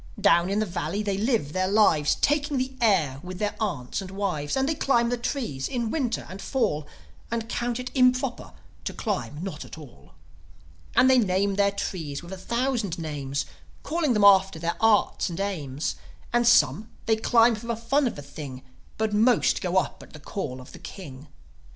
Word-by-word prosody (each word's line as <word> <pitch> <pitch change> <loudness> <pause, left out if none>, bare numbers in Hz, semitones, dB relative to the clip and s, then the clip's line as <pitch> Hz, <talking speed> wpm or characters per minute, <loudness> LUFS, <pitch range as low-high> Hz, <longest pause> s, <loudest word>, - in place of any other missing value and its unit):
Down 170 +2 +4
in 200 - 0
the 215 - +1
valley 175 +2 -3
they 200 -2 -1
live 215 - 0
their 185 0 +1
lives, 190 -8 +4
Taking 290 -1 +1
the 260 +1 -1
air 165 - +2
with 180 +1 -7
their 205 +1 -1
aunts 150 - -2
and 190 - -8
wives. 190 - -2
And 265 0 +1
they 320 - +1
climb 240 -5 +2
the 245 - +1
trees 235 - -3
in 245 -3 -2
the - - -1
Winter 245 -4 -1
and 190 +1 -8
Fall, 155 - -1 0.4
And 230 -1 -2
count 240 0 -2
it 250 0 -5
improper 255 -1 +1 0.3
to - - -3
climb 185 - -3
not 170 -6 -5
at - - -11
all. 150 -6 -14 0.8
And 260 - +6
they 260 -1 +6
name 200 -1 +1
their 200 0 +3
trees 165 -7 -4
with 175 +2 -8
a - - -6
thousand 235 -3 -1
names, 145 -4 -3 0.4
Calling 315 -5 0
them 210 -2 +2
after 195 -2 +6
their 170 +1 -2
Arts 225 -3 +3
and 170 - -6
Aims; 155 -8 -3 0.4
And 240 0 +3
some, 225 -2 +4 0.2
they 225 - +3
climb 230 +1 +4
for 225 +2 -7
the 235 - 0
fun 255 +5 +1
of - - -3
the 145 - -8
thing, 140 -2 -8 0.3
But 220 -1 0
most 230 +3 +3
go 180 0 0
up - - 0
at - - -15
the 155 - -10
call 140 -4 -5
of 130 - -13
the - - -11
King. 145 -7 -10
200 Hz, 195 wpm, -26 LUFS, 165-235 Hz, 0.8 s, And